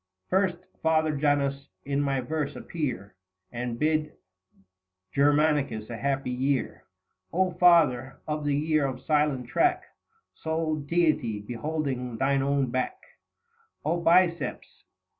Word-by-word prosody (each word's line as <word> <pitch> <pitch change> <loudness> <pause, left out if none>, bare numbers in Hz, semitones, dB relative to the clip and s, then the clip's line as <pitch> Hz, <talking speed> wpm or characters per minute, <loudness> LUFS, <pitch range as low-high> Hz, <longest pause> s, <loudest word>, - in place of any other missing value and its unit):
First, 190 -2 +2 0.2
Father 155 -1 +2
Janus, 140 -1 0 0.2
in 140 0 0
my 135 -2 0
verse 150 +3 -3
appear 120 - -4 0.4
70 120 - -5
And 120 -1 -3
bid 155 0 +1 1.0
Germanicus 145 -6 +2
a 115 - -4
happy 135 -1 -1
year. 130 +1 -1 0.5
O 185 +1 +1
Father, 165 -8 +4
of 150 0 -2
the 145 -1 +1
year 155 -1 +1
of 130 -1 -5
silent 150 -5 +1
track, 360 - +2 0.5
Sole 160 -1 -2
Deity 150 -8 +1
beholding 125 +1 -3
thine 135 +2 +2
own 140 -2 +1
back; 130 - -2 0.9
O 165 +3 +1
Biceps 170 -2 +1
145 Hz, 120 wpm, -27 LUFS, 130-160 Hz, 1.0 s, Father